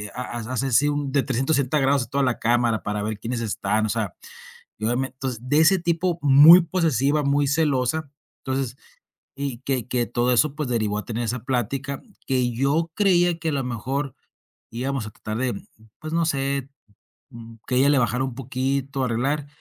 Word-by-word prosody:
haz 120 -2 -5 0.2
así 135 +1 +3
de - - +2
un 145 -2 -2
360 135 +2 +1
grados 135 -1 +2
de - - -22
toda 140 0 0
la 125 -2 0
cámara 120 -1 +1
para 105 0 -2
ver 110 -1 -4
quiénes 115 +2 -3
están, 110 -1 -1
o - - -5
sea. 110 -5 -2 0.7
Yo 110 +2 -1
ya 120 - +1
me 130 +1 -1
entonces, 130 -3 -5
de 130 +4 0
ese 180 +4 +5
tipo 170 0 0
muy 150 +5 +9
posesiva, 150 - +1
muy 140 +1 +2
celosa, 145 0 0 0.3
entonces 130 -1 -2 0.6
y 140 -4 -4
que 130 -3 -2
que 125 -2 0
todo 120 +1 0
eso 140 +4 +2
pues 150 -3 -3
derivó 110 -3 0
a - - -5
tener 115 +1 -3
esa 120 +2 -2
plática 135 +2 -2 0.3
que 125 -2 +1
yo 145 +7 0
creía 175 -4 +3
que 165 - -2
a - - -3
lo 135 -2 -1
mejor, 130 +3 -3 0.6
íbamos 130 0 -3
a 110 - -9
tratar 110 +2 -6
de, 130 -1 -1 0.5
pues, 155 0 -7
no 165 0 +2
sé, 140 -3 -1 0.6
mm, 115 -2 -11
que 125 - 0
ella 135 +2 +4
le 140 - +4
bajara 125 +2 +1
un 130 -3 -4
poquito, 135 +1 -2
arreglar. 135 +5 -1
135 Hz, 185 wpm, -23 LUFS, 120-145 Hz, 0.7 s, muy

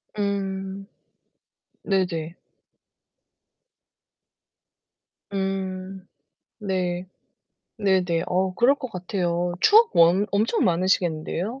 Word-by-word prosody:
음. 195 -1 -3 1.0
네네. 175 -4 -1 3.0
음. 190 -1 -4 0.5
네. 185 -2 -2 0.7
네네. 185 -4 +1
어 185 0 0
그럴 245 +6 +4
것 255 -4 -7
같아요. 175 -1 -2
추억 450 +2 +6
엄 170 +4 +5
엄청 215 +3 +1
많으시겠는데요? 180 +5 0
190 Hz, 135 characters per minute, -24 LUFS, 180-200 Hz, 3.0 s, 추억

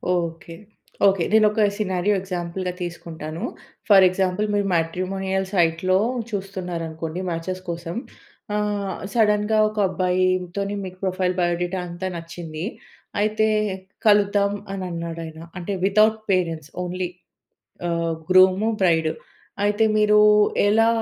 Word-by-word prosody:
Okay. 165 -1 -4 0.5
Okay. 195 -3 +3
నేనొక 215 0 +4 0.2
scenario 195 -1 +1
ఎగ్జాంపుల్‌గా 180 0 -4
తీసుకుంటాను. 165 -2 -6 0.5
ఫర్ 195 -2 +8
ఎగ్జాంపుల్ 185 +2 0
మీరు 205 -1 +1
మ్యాట్రిమోనియల్ 190 +3 -1
సైట్‌లో 175 +1 +2 0.3
చూస్తున్నారనుకోండి, 175 -5 -4
మ్యాచెస్ 175 +2 -4
కోసం. 170 0 -4 0.6
ఆహ్, 205 -2 -1 0.2
సడెన్‌గా 215 -1 +3
ఒక 215 - -13
అబ్బాయి 185 0 +1 0.3
తోని 200 0 -2
మీకు 185 0 -9
ప్రొఫైల్, 185 -1 0
బయో 175 -1 +2
డేటా 180 +1 -2
అంతా 175 +2 -5
నచ్చింది. 165 -1 -6 0.6
అయితే 215 +1 +2 0.6
కలుద్దాం 205 -1 +4 0.2
అనన్నాడు 170 -3 -4
ఆయన. 160 0 -10 0.2
అంటే 180 +3 -4
వితౌట్ 215 +2 +4
పేరెంట్స్ 165 -5 -1
ఓన్లీ 180 0 -3 0.8
ఆహ్, 170 -1 0 0.2
గ్రూము, 185 +3 +5
బ్రైడు. 160 -4 +3 0.5
అయితే 210 +2 +2
మీరు 210 0 +4 0.5
ఎలా 225 +2 +4
185 Hz, 110 wpm, -23 LUFS, 170-205 Hz, 0.8 s, ఫర్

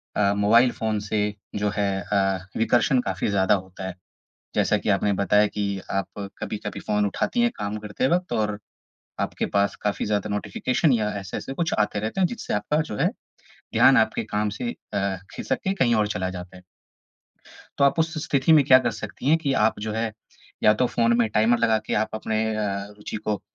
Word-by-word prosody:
अ, 100 -1 +3
mobile 115 +5 +4
phone 110 -2 -2
से 105 +1 -2 0.4
जो 105 0 0
है 105 - +1 0.2
अ, 95 -2 0
विकर्षण 120 +3 +3
काफ़ी 95 -4 -2
ज़्यादा 95 -2 +3
होता 95 0 -7
है। 95 - -5 0.6
जैसा - - +2
कि - - -5
आपने 100 +1 +2
बताया 105 +2 +3
कि 105 0 -4 0.3
आप 100 -1 -1 0.3
कभी-कभी 105 -1 -5
फ़ोन 105 -1 0
उठाती 170 - -1
हैं 240 0 +3
काम 105 0 -3
करते 105 +4 -2
वक़्त 180 +3 0
और 105 -1 0 0.6
आपके - - -2
पास 100 0 +2
काफ़ी 105 -1 -1
ज़्यादा 105 0 0
नोटिफ़िकेशन 105 - 0
या 110 -3 +1
ऐसे-ऐसे 95 +7 -6
कुछ 165 +2 -1
आते 105 -1 +1
रहते 110 - -3
हैं 185 - +5
जिससे 235 - -4
आपका 125 +9 0
जो 105 - -4
है - - +2 0.7
ध्यान - - +6
आपके - - +2
काम 105 0 -1
से 240 - -2 0.2
अ, 100 -1 0 0.2
ख़िसक 130 - -2
के 190 - +1
कहीं 120 -9 +2
और 105 -1 +2
चला 95 0 -2
जाता 90 0 -8
है। 90 - -14 1.2
तो 140 - +5
आप 140 +4 +3
उस 160 0 +1
स्थिति 140 +3 +3
में 150 -3 +6
क्या 130 0 +8
कर 120 -2 0
सकती 110 +5 -5
हैं 160 +2 +5
कि 145 -4 -1
आप 110 - +1
जो 110 0 -3
है, 110 0 -2 0.5
या 105 - +6
तो 125 +3 +2
फ़ोन 115 0 +2
में 115 -2 +3
टाइमर 110 +3 +3
लगा 110 -1 +3
के - - -1
आप 110 +1 +1
अपने 110 0 -1
अ, 100 -2 -2
रुचि 105 +1 -6
को 105 -1 -2
105 Hz, 200 wpm, -24 LUFS, 100-120 Hz, 1.2 s, क्या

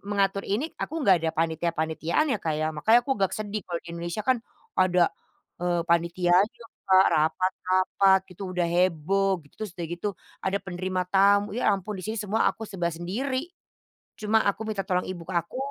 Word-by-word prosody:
mengatur 200 -1 +1
ini, 250 +11 -1
aku - - -3
enggak 185 -5 +5
ada 160 0 0
panitia-panitiaan 165 - 0
ya, - - 0
Kak, 160 -2 -1
ya 155 +1 -1
makannya 220 +11 +4
aku 270 - +1
agak 190 -1 +2
sedih 215 0 -3
kalau 170 -1 -2
di - - -11
Indonesia 170 +4 -4
kan 260 -1 +3 0.4
ada, 180 -2 +3 0.5
eee, 175 -1 +1
panitianya, 175 +5 +2 0.2
Kak, 190 0 +7
rapat-rapat 185 +4 +2
gitu 180 - -10
udah 175 - +2
heboh 185 +3 +2
gitu, 145 - -23
terus 200 -4 -6
udah 175 - -4
gitu 175 +4 -2 0.3
ada 190 +1 0
penerima 185 0 -2
tamu, 200 +1 +4
ya 245 - +1
ampun 195 +2 -6
di - - -11
sini 220 - -2
semua 210 +1 +1
aku 225 - -5
serba 185 -5 -2
sendiri. 255 - -3 0.6
Cuma 215 +1 +2
aku 200 -1 0
minta 215 -2 -3
tolong 180 -1 +1
Ibu 185 -2 -6
k - - -4
aku, 170 +8 -2
185 Hz, 180 wpm, -26 LUFS, 170-205 Hz, 0.6 s, Kak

